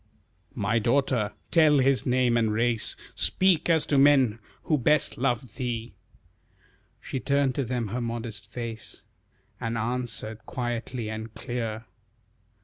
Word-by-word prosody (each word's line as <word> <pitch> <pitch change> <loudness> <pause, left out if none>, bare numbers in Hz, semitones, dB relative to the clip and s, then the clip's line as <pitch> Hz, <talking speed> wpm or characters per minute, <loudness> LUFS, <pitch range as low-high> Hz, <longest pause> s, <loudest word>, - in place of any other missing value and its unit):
"My 105 +3 +1
daughter, 120 -2 +1 0.2
tell 155 -3 +5
his 135 0 +2
name 125 -1 +3
and 115 -2 +2
race, 115 +1 +1 0.2
Speak 180 -3 +2
as 160 -2 +3
to 140 - +2
men 135 -6 +5 0.2
who 155 -3 +1
best 150 +3 +2
love 120 -3 -1
thee." 120 -3 -3 1.1
She 130 - -4
turned 140 -1 +1
to 140 - -1
them 120 -3 -2
her 125 +5 -3
modest 115 -3 -5
face, 115 -2 -7 0.6
And 115 -1 -2
answered 115 -1 -3
quietly 120 -1 -3
and 110 0 -6
clear. 115 -3 -4
120 Hz, 130 wpm, -27 LUFS, 115-135 Hz, 1.1 s, tell